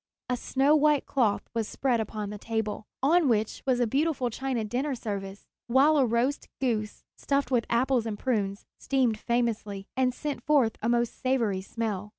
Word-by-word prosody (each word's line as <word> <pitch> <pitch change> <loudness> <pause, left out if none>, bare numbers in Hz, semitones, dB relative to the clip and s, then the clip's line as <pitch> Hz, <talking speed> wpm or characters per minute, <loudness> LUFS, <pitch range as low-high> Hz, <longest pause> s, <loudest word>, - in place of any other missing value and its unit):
A 250 - +1
snow 275 +4 +2
white 300 -1 +3
cloth 230 -7 +1
was 225 -2 -1
spread 255 -4 0
upon 215 -1 -4
the 210 - -7
table, 220 -1 -3 0.2
on 315 +1 +4
which 220 -2 0
was 255 -2 +2
a 245 - +3
beautiful 270 0 0
china 255 -2 -2
dinner 260 +6 -1
service, 200 -3 -5 0.2
while 270 +6 +5
a 265 -3 +4
roast 235 +5 0
goose, 220 -5 -2
stuffed 280 0 -1
with 240 -2 +1
apples 245 0 +2
and 210 -2 -3
prunes, 205 -5 -1
steamed 250 -5 +1
famously, 220 -5 -1
and 255 -1 +2
sent 290 +3 -5
forth 280 -8 +3
a 225 - 0
most 235 -1 0
savory 230 -7 +1
smell. 210 -1 -4
235 Hz, 170 wpm, -28 LUFS, 215-265 Hz, 0.2 s, while